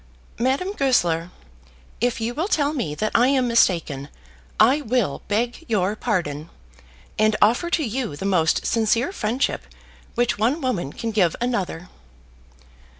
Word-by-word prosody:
"Madame 270 +11 0
Goesler, 175 - +1 0.7
if 245 +1 0
you 230 +2 -2
will 320 +8 -1
tell 295 -7 +1
me 170 - -3
that 215 +6 -1
I 240 +2 +4
am 260 -2 +2
mistaken, 165 - +1 0.5
I 265 +7 +5
will 235 - -1
beg 235 +8 -1
your 205 -2 +1
pardon, 170 - -2 0.7
and 215 0 +3
offer 240 +11 +3
to 345 -2 +1
you 235 - -3
the 170 - -6
most 170 -5 +2
sincere 230 - +1
friendship 245 - -1 0.5
which 240 -3 +1
one 245 +9 +1
woman 205 - -2
can 230 +7 -4
give 185 -6 +2
another." 195 -8 -2
225 Hz, 140 wpm, -23 LUFS, 185-255 Hz, 0.7 s, I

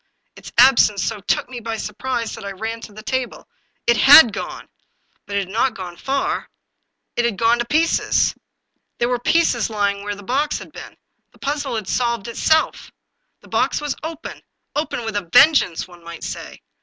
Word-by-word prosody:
Its - - -11
absence 235 -6 +5
so 225 -2 -2
took 200 - -1
me 250 -1 -7
by 225 -1 -4
surprise 230 +2 -3
that - - -8
I 200 0 -5
ran 225 +4 -5
to 215 - -10
the 215 +1 -11
table. 260 0 -3 0.4
It 235 - +3
had 270 -4 +8
gone. - - -6 0.6
But 200 - -5
it 200 - +2
had 185 - -12
not 230 +4 0
gone 180 -3 -7
far; 270 +9 -2 0.7
it 240 - +1
had 235 -4 0
gone 230 +1 +3
to 240 - 0
pieces! 315 +6 +2 0.6
There 240 - +1
were 245 -1 0
the 245 - 0
pieces 285 -10 +2
lying 200 -2 -1
where 205 0 -4
the 205 - -12
box 280 +8 0
had - - -11
been. - - -11 0.4
The - - -21
puzzle 285 -3 -3
had 215 -4 -4
solved 235 -4 -1
itself. 315 +7 +1 0.5
The - - -18
box - - 0
was 295 -2 -3
open, 320 +1 -7 0.3
open 295 -6 -2
with 220 -2 -4
a 195 -5 -3
vengeance, 275 - +5
one 175 -1 -16
might 170 0 -9
say. - - -7
235 Hz, 190 wpm, -20 LUFS, 205-265 Hz, 0.7 s, had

